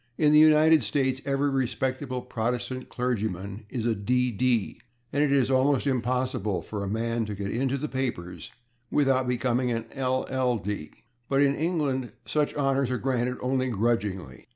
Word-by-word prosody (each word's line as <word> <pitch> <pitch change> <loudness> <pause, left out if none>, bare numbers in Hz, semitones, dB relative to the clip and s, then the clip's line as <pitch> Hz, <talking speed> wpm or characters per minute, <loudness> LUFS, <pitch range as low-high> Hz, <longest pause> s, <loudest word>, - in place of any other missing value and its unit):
In 150 -1 +4
the 150 - +8
United 155 -1 +6
States 130 +4 0
every 140 +1 +1
respectable 130 0 -2
Protestant 125 +2 -3
clergyman 105 -4 -3
is 115 -3 -3
a 120 - +2
D.D., 125 +1 0 0.3
and 145 +1 +3
it 145 - +1
is 135 -2 +3
almost 135 +1 +3
impossible 125 -6 -1
for 105 -2 -5
a - - -3
man 115 +2 -1
to 105 - -4
get 100 0 -4
into 135 +3 0
the 150 +3 -3
papers 125 -11 -4 0.4
without 135 -3 +2
becoming 125 0 0
an 115 -1 -2
LL.D., 125 - -1 0.4
but 140 +1 +3
in 140 -1 +3
England 140 - -1
such 150 -1 0
honors 135 -2 +1
are 125 - 0
granted 125 -1 -1
only 130 0 0
grudgingly. 100 - -2
125 Hz, 155 wpm, -27 LUFS, 115-135 Hz, 0.4 s, the